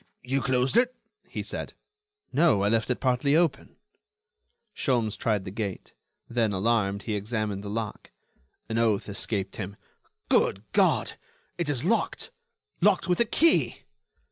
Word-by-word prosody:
"Ah! - - -37 0.2
you 135 +2 0
closed 130 - +1
it?" 250 +1 +3 0.3
he - - -5
said. - - -5 0.6
"No, 145 -11 +4
I 100 - +3
left 115 +1 +1
it 125 - 0
partly 130 +2 +2
open." 160 -5 +1 1.0
Sholmes 115 - 0
tried 105 -4 0
the 95 - -5
gate; 100 -3 -5 0.3
then, 115 -3 +1
alarmed, 100 -1 +1
he 110 - -2
examined 105 -1 -2
the 100 - -5
lock. 110 -1 -4 0.6
An 115 0 -1
oath 110 -3 +2
escaped 100 -1 -3
him: 100 -1 -5 0.5
"Good 95 - +2
God! - - +2 0.4
it 170 -4 -1
is 135 -5 -1
locked! - - 0 0.5
locked 195 0 +3
with 180 -1 +1
a 235 - +4
key!" 215 - +3
115 Hz, 145 wpm, -27 LUFS, 100-135 Hz, 1.0 s, No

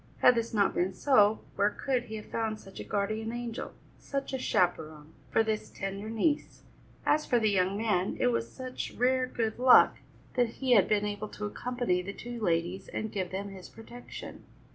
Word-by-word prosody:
Had - - +8
this 230 -1 -1
not 205 -3 +2
been 185 +2 0
so, 215 -4 +4
where 200 +1 +3
could 250 +3 -1
he 220 -2 -7
have 210 - -7
found 220 -1 -2
such 195 -2 -12
a - - -4
guardian 215 +2 -2
angel, 240 -1 -5 0.3
such 275 -1 -4
a 265 - -1
chaperon, 155 -7 0 0.2
for 225 - +3
this 220 -1 -2
tender 195 +2 -5
niece? 255 +7 -1 0.4
As 305 0 +2
for 245 - +3
the 220 -2 +2
young 190 0 +1
man, 205 -4 0
it - - +3
was 115 0 -2
such 255 -1 -6
rare 255 +1 +2
good 225 -2 -2
luck 255 0 +7 0.4
that 245 -3 +1
he 265 -2 -1
had 200 -6 +6
been 210 -1 +2
able 205 0 -4
to 210 - -6
accompany 240 -4 -1
the 195 +2 -6
two 240 +2 -7
ladies 175 0 0
and 220 - -4
give 185 -3 -2
them 195 +2 -4
his 190 -2 -10
protection. 240 +2 -10
215 Hz, 190 wpm, -30 LUFS, 195-240 Hz, 0.4 s, Had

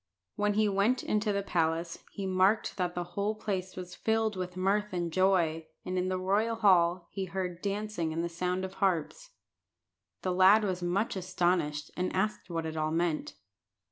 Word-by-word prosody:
When 205 0 +1
he 215 0 +3
went 205 +6 +2
into 210 0 +1
the 200 0 -1
palace, 165 -2 -1
he 200 - -5
marked 190 +3 +2
that 180 -2 -1
the 175 - -1
whole 205 +3 0
place 190 -3 -3
was 180 -1 -7
filled 220 -1 0
with 180 -1 -5
mirth 205 +2 +1
and 175 -2 -2
joy, 170 -4 +2 0.2
and 185 - -3
in 185 0 0
the 185 - 0
royal 205 +5 +1
hall 180 -5 +3
he 195 -1 -3
heard 185 -2 -4
dancing 200 -4 -2
and 165 +1 -2
the - - 0
sound 180 +2 -2
of 190 - -7
harps. 195 - 0 0.9
The 185 - 0
lad 190 +4 +6
was 185 -3 -1
much 190 +6 0
astonished, 175 -5 0
and 180 0 -1
asked 190 -1 -1
what 165 -1 -2
it 160 0 -4
all 155 0 0
meant. 165 -1 -1
185 Hz, 180 wpm, -30 LUFS, 175-200 Hz, 0.9 s, lad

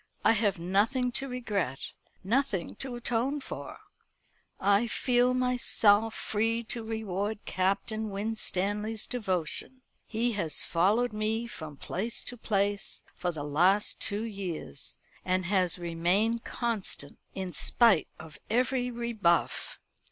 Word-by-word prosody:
I - - +7
have 210 -3 +2
nothing 210 +9 +1
to 270 +3 +1
regret, 210 - -3 0.3
nothing 220 -3 0
to 265 -2 -4
atone 245 +4 0
for. - - -7 0.8
I 200 +4 +3
feel 250 +1 +2
myself 225 -4 +3
free 225 +2 0
to 235 - -3
reward 215 -2 -3
Captain 200 +4 -1
Winstanley's 210 +1 -1
devotion. 210 +3 -2 0.2
He 230 +2 0
has 170 -8 +3
followed 210 +8 +2
me 215 +2 -1
from 155 - -8
place 215 - -3
to 245 - -4
place 205 -3 -1
for 175 - -2
the 155 -3 -5
last 180 +8 +2
two 205 +2 +1
years; 190 -9 -4 0.3
and 185 0 0
has 185 -2 +2
remained 180 +7 +1
constant, 220 - -2 0.2
in 185 -2 -4
spite 230 -9 +5
of 160 -2 -12
every 250 +2 +1
rebuff. 230 -8 0
210 Hz, 120 wpm, -29 LUFS, 185-235 Hz, 0.8 s, I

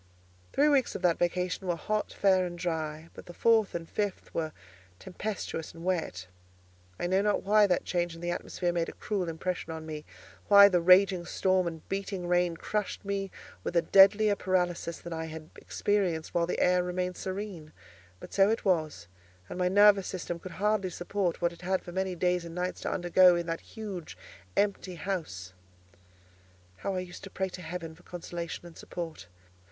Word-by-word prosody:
Three 290 +2 +3
weeks 280 -4 +2
of - - -5
that 175 -2 +3
vacation 180 +2 -1
were 175 - +1
hot, 210 +6 -2
fair, 190 -2 +3
and 175 0 -7
dry, 160 -2 -3
but - - -12
the 175 - -10
fourth 225 -5 +3
and 165 -1 -4
fifth 205 +1 -3
were 160 -1 -2 0.5
tempestuous 185 - -5
and 165 +1 -9
wet. 160 - -1 0.7
I - - -1
do 190 +2 +2
not 210 0 +2
know - - -3
why 210 +1 +5
that 180 - +1
change 175 -2 -1
in 165 - -11
the 175 0 -1
atmosphere 175 0 -2
made 170 -1 0
a - - -8
cruel 195 -5 -2
impression 165 +1 -3
on 160 0 -6
me, 155 -1 -6 0.4
why 200 0 +9
the 180 -3 +2
raging 185 +1 +6
storm 185 -1 +1
and 160 -2 -7
beating 195 -2 -3
rain 175 -1 +2
crushed 210 +1 -3
me 195 -1 -2 0.3
with - - -4
a 170 - +4
deadlier 205 +2 +6
paralysis 180 -3 -1
than 170 - -7
I 160 0 -3
had 160 0 -9
experienced 185 -6 -1
while 170 -1 +1
the - - -2
air 180 0 +4
had 180 - +1
remained 180 0 -2
serene; 185 -5 -5 0.5
but - - -11
so 195 0 +5
it 225 0 -1
was; 155 - 0 0.4
and - - -6
my 180 - +2
nervous 200 0 +6
system 175 -2 -4
could 180 0 -9
hardly 205 +1 +1
support 175 0 -2
what 170 0 +2
it 170 - -15
had 185 +1 0
for 175 - -8
many 190 0 -2
days 180 0 +1
and 170 0 -8
nights 180 +1 -3
to - - -2
undergo 180 0 +5
in 170 0 -1
that 165 0 -3
huge 195 - -7 0.4
empty 200 -3 0
house. 155 - -4 1.2
How 195 - -3
I 185 - -1
used 180 0 -10
to - - -8
pray 190 0 -2
to 180 - -9
Heaven 165 -1 -6
for 165 - -19
consolation 175 -1 -6
and 170 -1 -12
support! 165 - -7
180 Hz, 190 wpm, -29 LUFS, 170-195 Hz, 1.2 s, why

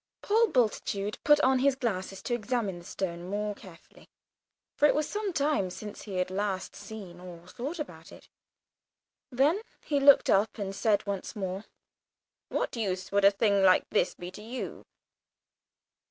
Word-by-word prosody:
Paul 450 +3 +4
Bultitude 210 - 0
put 295 0 +6
on 260 -1 +4
his 275 0 +3
glasses 195 -6 -3
to 245 - -2
examine 225 -5 -1
the 175 - -14
stone 175 -1 -4
more 210 +1 -2
carefully, 185 -4 -16 0.7
for 295 - +5
it - - +2
was 300 0 +1
some 415 -1 -2
time 285 - +1
since 210 +3 -8
he 200 -3 -7
had 185 0 -1
last 190 -1 -2
seen 195 -3 -9
or 175 -2 -11
thought 275 - -5
about 300 - -8
it. - - -14 1.0
Then 285 - +3 0.2
he 290 -2 +1
looked 280 0 +7
up 205 +3 +2
and 195 -2 -4
said 205 0 +2
once 200 +2 -4
more, 190 0 -4 0.8
"What - - -2
use 190 -5 -2
would 200 0 +3
a - - +10
thing 200 0 +2
like 185 -1 +5
this - - +1
be 180 +1 -8
to 200 - -10
you?" 240 +4 -6
205 Hz, 165 wpm, -29 LUFS, 190-260 Hz, 1.0 s, a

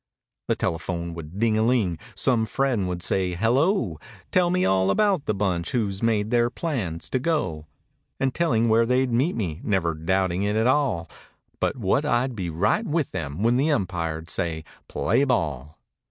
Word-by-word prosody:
The - - +2
telephone 85 0 -3
would 85 +2 -8
ding 110 0 +2
a - - +3
ling, 110 -9 +1 0.2
some 115 -4 +2
friend 125 -5 0
would 90 -1 -4
say 90 -2 0
"Hello!" 120 - +1 0.3
Tell 180 -1 +3
me 180 +1 +1
all 95 0 +2
about 195 - +2
the 105 - 0
bunch 90 -4 -1
who's 100 -5 -1
made 110 -2 +1
their 120 -1 +3
plans 110 - -3
to 130 - +1
go. 95 - -1 0.5
And 135 -1 0
telling 120 -9 +2
where 115 +1 +4
they'd 125 +1 +2
meet 135 +9 +1
me—never 90 -2 -1
doubting 95 +3 0
it 105 +1 0
at 110 +1 +2
all 125 - +1 0.5
But - - 0
what - - +1
I'd 125 +1 0
be 90 -5 -3
right 105 - +1
with 155 -2 -1
them 70 +7 -4
when 120 +2 +3
the 145 +4 +2
umpire'd 85 - -2
say 80 -4 -2 0.2
"Play 140 - +1
ball." 80 - -1
105 Hz, 170 wpm, -24 LUFS, 85-130 Hz, 0.5 s, where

